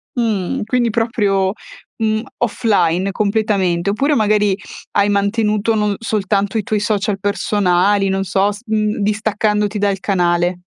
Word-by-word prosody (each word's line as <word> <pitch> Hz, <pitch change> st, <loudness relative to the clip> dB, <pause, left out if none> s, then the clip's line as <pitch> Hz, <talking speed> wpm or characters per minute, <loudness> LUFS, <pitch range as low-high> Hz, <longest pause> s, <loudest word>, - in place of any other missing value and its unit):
Mh, 220 Hz, -7 st, -1 dB
quindi 240 Hz, +1 st, +1 dB
proprio, 205 Hz, -4 st, +1 dB, 0.4 s
mhmm, 220 Hz, -1 st, 0 dB, 0.2 s
offline 195 Hz, -5 st, +1 dB
completamente 200 Hz, -4 st, 0 dB
oppure 275 Hz, +9 st, +1 dB
magari 210 Hz, -3 st, +2 dB, 0.4 s
hai 205 Hz, 0 st, +2 dB
mantenuto 210 Hz, +2 st, +1 dB
non 210 Hz, -1 st, 0 dB
soltanto 205 Hz, -2 st, -1 dB
i -, -, -3 dB
tuoi 210 Hz, +1 st, -1 dB
social 210 Hz, -1 st, -1 dB
personali 200 Hz, -1 st, +1 dB
non 195 Hz, 0 st, 0 dB
so 195 Hz, +2 st, +1 dB
s 205 Hz, +2 st, -9 dB
mhmm, 215 Hz, -1 st, 0 dB
distaccandoti 210 Hz, 0 st, 0 dB
dal 200 Hz, -2 st, 0 dB
canale? 175 Hz, -2 st, 0 dB
205 Hz, 130 wpm, -18 LUFS, 195-215 Hz, 0.4 s, magari